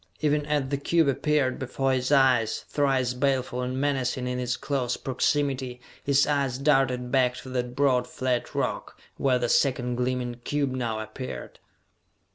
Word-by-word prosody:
Even 150 -1 +1
as 145 -3 0
the 140 - 0
cube 165 +2 +2
appeared 140 -1 +1
before 135 0 -1
his 130 +1 -1
eyes, 130 -5 +3
thrice 135 -4 +1
baleful 130 -1 0
and 130 +1 -2
menacing 130 -3 0
in 125 0 -2
its 125 0 -1
close 130 -4 -1
proximity, 130 -1 -1 0.2
his 140 0 +3
eyes 140 -4 0
darted 135 -3 +2
back 125 -2 +3
to 130 - -9
that 125 -1 -3
broad 130 -3 +2
flat 125 -1 -2
rock, - - -3 0.2
where 130 -2 +2
the 120 -1 -1
second 125 -2 +1
gleaming 125 -1 -2
cube 145 -2 0
now 120 -4 -2
appeared! 110 +4 -7
130 Hz, 155 wpm, -26 LUFS, 125-140 Hz, 0.2 s, eyes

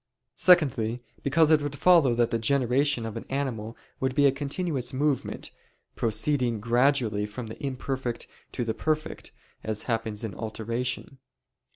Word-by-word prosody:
Secondly, 125 -10 +4 0.2
because 155 +3 +3
it 155 -1 +5
would 145 -1 -3
follow 160 -6 +5
that 120 0 +2
the 115 - 0
generation 130 +1 +2
of 110 - -5
an - - -6
animal 125 -5 -3 0.2
would 130 -1 -1
be 145 -1 +4
a 140 - +6
continuous 140 0 -2
movement, 140 +1 -1 0.4
proceeding 120 0 0
gradually 115 -2 +2
from 115 +3 -7
the 110 +4 -10
imperfect 130 -2 -3 0.3
to 120 - -2
the 110 - -1
perfect, 155 +3 -3 0.3
as 110 -1 -2
happens 115 -2 -2
in 110 -4 -4
alteration. 115 +5 -4
125 Hz, 145 wpm, -27 LUFS, 115-140 Hz, 0.4 s, a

